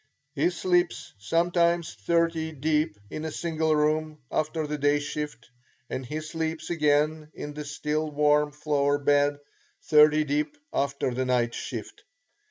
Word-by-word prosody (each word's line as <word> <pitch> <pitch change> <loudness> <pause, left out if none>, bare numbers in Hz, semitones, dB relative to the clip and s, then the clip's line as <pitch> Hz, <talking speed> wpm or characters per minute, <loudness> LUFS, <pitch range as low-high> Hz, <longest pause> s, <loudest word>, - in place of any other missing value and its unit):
He 155 +3 +2
sleeps 180 -1 0
sometimes 170 - +1
thirty 165 +8 0
deep 150 -5 0
in 155 - -5
a 160 - -2
single 160 -1 0
room 155 +1 +1
after 155 0 -1
the 150 0 -4
day 145 +1 +3
shift, 145 -4 -5 0.4
and 130 - -3
he 150 +5 -4
sleeps 160 +1 -4
again 150 -1 +1
in 145 - -6
the 150 0 -6
still 150 +1 -2
warm 150 0 +3
floor 145 -1 +1
bed, 145 0 +2 0.5
thirty 150 0 +6
deep, 150 - -1 0.2
after 140 -2 0
the 130 +1 -1
night 120 -2 +1
shift. 115 -5 -6
150 Hz, 140 wpm, -27 LUFS, 145-160 Hz, 0.5 s, thirty